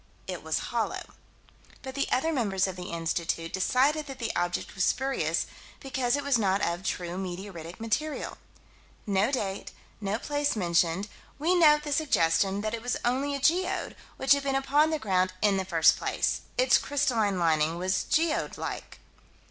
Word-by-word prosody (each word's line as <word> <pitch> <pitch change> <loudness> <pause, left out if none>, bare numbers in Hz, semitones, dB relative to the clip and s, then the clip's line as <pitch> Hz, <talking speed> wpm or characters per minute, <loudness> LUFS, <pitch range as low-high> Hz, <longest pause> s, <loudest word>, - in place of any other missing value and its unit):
It - - -5
was - - -1 0.2
hollow. - - -1 0.8
But 265 -1 -6
the 275 +1 -1
other 320 +6 +1
members 200 -8 +1
of 190 -2 -4
the 180 0 -7
Institute 165 0 -2
decided 275 +10 +2
that 270 -2 -7
the 230 -3 -3
object 175 0 -2
was 190 - -1
spurious, 265 +6 0 0.3
because 260 -2 0
it 285 - -3
was 275 -4 +2
not 195 -2 +2
of 170 +1 -1
"true 180 -1 -3
meteoritic 180 -2 -7
material." 280 +7 -2 0.7
No 200 +3 +2
date; 200 -7 -3 0.3
no 200 +1 -1
place 290 +2 -1
mentioned; 175 0 +1 0.3
we 320 +5 +2
note 300 -4 +5
the 295 - -5
suggestion 195 - +2
that 215 +1 -2
it 230 - -3
was 245 +1 -1
only 270 +4 0
a - - -3
geode, 355 +6 +1 0.2
which 265 - 0
had 280 - +1
been 275 -1 -1
upon 285 +3 +3
the 315 - 0
ground 185 -7 +1
in 205 -1 +3
the 190 - -1
first 165 -3 +4
place. - - -1 0.2
Its - - +5
crystalline 235 -9 +1
lining 160 -1 +2
was 185 +1 0
geode 320 -1 0
like. - - -6
220 Hz, 170 wpm, -28 LUFS, 185-280 Hz, 0.8 s, note